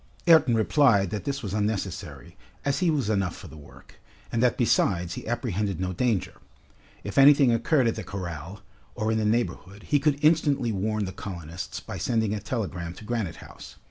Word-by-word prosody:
Ayrton 160 -8 +6
replied 110 - +3
that 105 -2 -4
this 140 -1 -3
was 100 -3 -4
unnecessary, 100 - -3 0.3
as 140 -1 +1
he 180 -2 +2
was 145 -8 0
enough 95 -5 0
for - - -11
the - - -12
work, 75 -2 -16 0.3
and 115 - 0
that 125 -1 +2
besides 90 -8 +1
he - - -7
apprehended 105 - -2
no 95 0 -2
danger. 110 -1 -1 0.6
If 100 +5 -1
anything 140 -2 +7
occurred 125 +4 +2
at 115 - +1
the 110 - -6
corral, 90 -1 -7 0.3
or 110 +1 -1
in 110 - +1
the 110 - 0
neighborhood, 105 -3 -2
he 145 - +2
could 145 0 +1
instantly 145 -6 +3
warn 105 +1 -1
the 95 - -5
colonists 85 -2 -7
by - - -7
sending 110 -3 0
a 105 - -2
telegram 90 -6 -4
to - - -12
Granite 110 -7 -2
House. - - -12
110 Hz, 185 wpm, -26 LUFS, 95-125 Hz, 0.6 s, anything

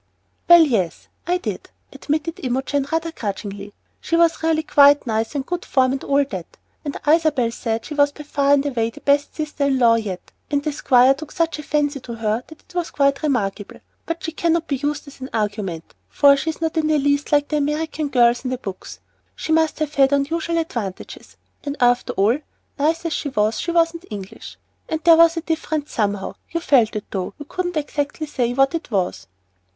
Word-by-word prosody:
"Well, 345 -1 +9
yes, 205 - -1 0.2
I 355 +1 +2
did," 360 - -6 0.2
admitted 310 +2 -3
Imogen, 270 +2 -1
rather 325 0 -1
grudgingly. 200 -5 -6 0.3
"She 335 - -1
was 335 -1 +3
really 320 -1 +1
quite 285 -2 +5
nice, 225 +3 -2
and 275 -2 -2
good 355 +2 -3
form, 255 -1 +2
and 270 - -3
all 280 0 +2
that, 190 -10 -8 0.3
and 285 - -4
Isabel 300 -7 +3
said 225 -1 -3
she - - -6
was 290 -1 +4
far 285 -1 0
and 285 0 +3
away 235 -5 0
the - - -14
best 285 0 +1
sister 300 -2 -2
in 275 -1 +2
law 235 -2 +5
yet, 195 -5 -6 0.2
and 285 0 0
the 305 - -1
Squire 260 -2 +4
took 295 +2 -10
such 330 -2 -1
a - - -3
fancy 295 -1 0
to 240 -2 -8
her 225 +1 -1
that 315 - -15
it - - -21
was 350 -2 -2
quite 280 -1 +1
remarkable. 210 -8 -2 0.3
But 330 0 -4
she 325 - -3
cannot 335 0 0
be 280 - -1
used 290 +2 -3
as 280 -1 -14
an 260 - -6
argument, 205 -6 -3 0.2
for 280 -1 +5
she's 315 +3 -4
not 320 -1 0
the 320 - +1
least 290 -2 +1
like 290 -1 +3
the 300 - 0
American 300 +1 -2
girls 240 -2 +3
in 255 - -2
the 255 - -2
books. 195 -6 -8 0.4
She - - -4
must 320 0 +2
have 305 -1 -2
had 270 -1 +4
unusual 320 +4 0
advantages. 235 - -5 0.3
And 285 0 -4
after 245 -1 +2
all, 215 +8 +2 0.4
nice 325 +4 +1
as 330 - -1
she 285 - -2
was, 215 -3 0
she - - -3
wasn't 335 0 +1
English. 200 -3 -9 0.5
There 335 0 +8
was 335 0 +5
a - - -1
difference 315 -2 -3
somehow, 205 -3 -1 0.2
you 335 - -2
felt 255 -10 +3
it 210 - -4
though 190 0 -4
you 290 - -9
couldn't 355 +3 -3
say 305 - +2
exactly 290 -4 -2
what 270 +2 +3
it 330 - -4
was." 190 -5 -2
285 Hz, 200 wpm, -21 LUFS, 240-315 Hz, 0.5 s, Well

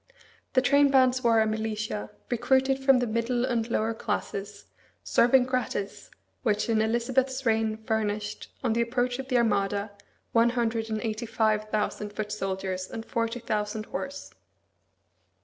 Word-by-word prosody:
The 255 - +4
trainbands 265 -2 +4
were 230 -2 +4
a - - +3
militia, 215 -1 -3 0.2
recruited 265 +2 +2
from 270 -1 +5
the 245 - +1
middle 235 +2 0
and 235 -2 -1
lower 225 0 0
classes, 205 -2 -4 0.4
serving 250 +2 +4
gratis, 250 -6 -3 0.3
which 210 -3 +1
in 220 -1 +3
Elizabeth's 255 +4 0
reign 220 -1 +1
furnished, 215 -1 -3
on 235 -4 +2
the 235 - +1
approach 245 +1 0
of 265 - -5
the 255 -2 +2
Armada, 205 -2 +1 0.4
one 230 +1 +4
hundred 230 -2 -1
and 220 -1 -1
eighty 225 0 -3
five 215 -1 +1
thousand 210 -1 -2
foot 210 0 -4
soldiers 190 -2 -3
and 225 - -6
forty 230 +1 -2
thousand 215 -1 -2
horse. 280 +4 -6
225 Hz, 145 wpm, -27 LUFS, 215-245 Hz, 0.4 s, from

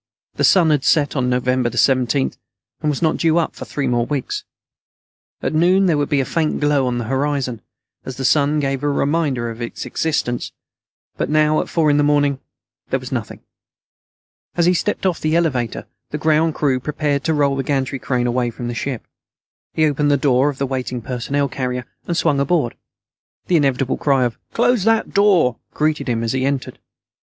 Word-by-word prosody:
The - - -2
sun 175 -5 +5
had 145 -3 +1
set 150 -3 +2
on 125 -2 0
November 125 0 +1
17th, 130 +1 +1 0.5
and 150 - 0
was 145 +2 -2
not 160 - +2
due 165 0 +2
up 170 - 0
for - - -7
three 140 - -3
more 120 -2 +1
weeks. 145 -3 -3 1.0
At - - -1
noon, 180 +5 +4
there 170 -4 +3
would 145 -1 -1
be 145 - +2
a - - -2
faint 160 +1 -1
glow 145 -3 +2
on 125 -1 -1
the 120 - -2
southern 130 +4 -1
horizon, 135 -5 -1 0.4
as 130 -1 -7
the 135 - -3
sun 150 +2 +3
gave 135 -2 -1
a 145 - 0
reminder 140 -5 0
of 115 +1 -9
its 120 - -5
existence, 150 -6 -2 0.6
but - - -2
now, 155 0 +3
at - - -7
four 155 -3 +2
in 145 - +3
the 145 - +3
morning, 145 -2 +2 0.5
there - - 0
was - - -9
nothing. - - -4 1.2
As 170 - +3
he 180 - +4
stepped 195 +3 -1
off 180 -3 +1
the 155 +1 0
elevator, 135 -9 0 0.2
the 150 - -3
ground 155 +1 +2
crew 135 -4 +1
prepared 145 +1 -1
to 160 - +2
roll 140 -2 +2
the 135 - -1
gantry 135 -1 -1
crane 125 -2 -1
away 120 0 0
from 120 +1 -6
the - - -3
ship. 125 0 -4 0.7
He 155 - +2
opened 150 0 +1
the 145 - +4
door 135 0 +3
of 140 - -5
the 140 - -1
waiting 125 -2 -4
personnel 140 +4 -1
carrier 125 -2 -3 0.2
and 170 - -1
swung 140 - +2
aboard. 140 -3 +1 0.7
The 180 - +1
inevitable 135 -3 +1
cry 135 -3 +2
of 120 -2 -2
"close 240 -3 +2
that 225 0 +2
door" 190 - +3 0.2
greeted 155 -2 0
him 115 -1 0
as 115 - -1
he 130 0 0
entered. 135 -1 -2
140 Hz, 200 wpm, -20 LUFS, 130-155 Hz, 1.2 s, sun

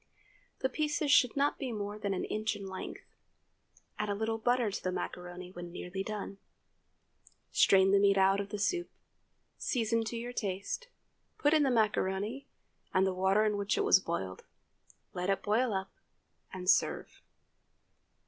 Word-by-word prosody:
The 260 - +3
pieces 300 +1 0
should 250 -2 +5
not 285 +1 +1
be 265 -3 -3
more 210 -1 -4
than 200 -2 -1
an - - -2
inch 215 0 -1
in 200 -1 -7
length. 190 -1 -6 1.0
Add 210 - -1
a 205 - 0
little 220 +2 -1
butter 245 -1 +2
to - - -5
the 185 - 0
macaroni 180 0 -6
when 175 -1 -8
nearly 180 +2 -5
done. 200 -1 -5 1.1
Strain 190 0 +5
the 200 - +5
meat 200 0 +4
out 195 +1 +4
of 200 0 -4
the 210 - -4
soup, 345 - 0 0.7
season 230 -2 0
to 230 +1 -4
your 240 +1 -5
taste, 200 - -3 0.5
put 295 +1 +3
in 310 - +5
the 280 - +3
macaroni, 215 +1 0 0.4
and 190 0 +3
the 190 - 0
water 190 +3 +3
in 210 -1 +1
which 200 0 0
it - - +2
was - - +6
boiled; 95 - -4 0.7
let 180 +1 -2
it 195 -1 0
boil 225 +4 +2
up, 190 -1 -3 0.6
and 180 -1 -7
serve. - - +2
205 Hz, 165 wpm, -32 LUFS, 190-230 Hz, 1.1 s, was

